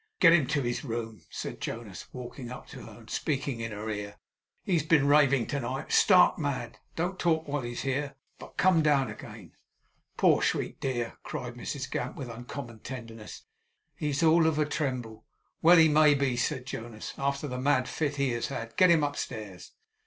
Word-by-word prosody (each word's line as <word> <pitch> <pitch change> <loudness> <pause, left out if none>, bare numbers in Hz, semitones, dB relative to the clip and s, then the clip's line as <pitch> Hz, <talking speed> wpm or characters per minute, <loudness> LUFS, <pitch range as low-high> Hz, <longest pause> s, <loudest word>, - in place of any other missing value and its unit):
'Get 165 -4 +8
him 155 -6 +4
to 145 -3 0
his 120 0 -2
room,' 115 -4 -5
said - - -6
Jonas, 110 -5 -6
walking 125 0 -8
up 125 - -8
to - - -9
her, - - -12
and - - -17
speaking 140 -4 -2
in 115 0 -4
her 105 +1 -6
ear. 105 -1 -4 0.5
'He 190 - -1
has 165 - +4
been 150 -1 +3
raving 140 -4 +4
to 145 - -1
night 130 +2 -4
stark 185 -3 +6
mad. 140 -6 -3 0.2
Don't 180 +3 -2
talk 160 -2 +1
while 145 0 -1
he's 120 0 -5
here, 135 +1 -2 0.2
but - - -12
come 185 -3 +4
down 145 -3 +2
again.' - - -11 0.7
'Poor - - +4
sweet - - -1
dear!' 120 -3 -3
cried 125 -5 -5
Mrs 130 +2 -5
Gamp, 125 - -3
with 130 -4 -6
uncommon 120 0 -8
tenderness. 115 -3 -8 0.5
'He's 150 +1 -1
all 165 0 +5
of 160 -2 +1
a 155 - +2
tremble.' 130 -7 -3 0.4
'Well 175 +2 +7
he 160 -1 +7
may 150 -1 +5
be,' 135 -3 +1
said 125 +1 -1
Jonas, 115 -4 -6
'after 140 +1 -1
the 125 -1 -4
mad 130 -2 +2
fit 145 -2 -2
he 140 -2 +1
has 120 +3 -2
had. 115 -5 -6
Get 185 - +6
him 165 -3 +5
upstairs. 110 -9 -5
135 Hz, 190 wpm, -29 LUFS, 120-150 Hz, 0.7 s, Get